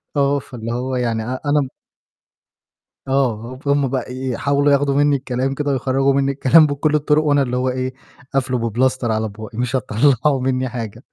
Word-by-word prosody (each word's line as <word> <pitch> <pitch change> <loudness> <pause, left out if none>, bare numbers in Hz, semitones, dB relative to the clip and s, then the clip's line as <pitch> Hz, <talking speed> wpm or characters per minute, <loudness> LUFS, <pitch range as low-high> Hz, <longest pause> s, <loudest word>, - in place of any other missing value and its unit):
آه، 140 0 +2
فاللي 115 -3 -7
هو 130 +2 -2
يعني 115 -3 -1
أ - - -7 0.2
أنا 145 0 +3
م - - -5 1.4
آه، 130 -3 -1
فهُم 140 -1 +1
بقى 125 -1 -3
يحاولوا 140 +3 0
ياخدوا 140 0 +2
مني 145 0 +3
الكلام 130 0 -2
كده 145 +1 -2
ويخرّجوا 135 +1 +1
مني 140 0 +1
الكلام 140 +3 +5
بكُلّ 145 +1 0
الطرق 150 +1 +2
وأنا 145 -2 +3
اللي 125 -2 -1
هو 130 +1 0
إيه، 130 0 -3 0.4
قافلُه 125 -3 0
بPlaster 130 +3 0
على 110 0 -1
بُقِّي 110 +2 -10
مش 125 +1 -1
هتطلّعوا 130 +3 +2
مني 130 0 0
حاجة. 115 -1 -6
130 Hz, 175 wpm, -19 LUFS, 125-140 Hz, 1.4 s, الكلام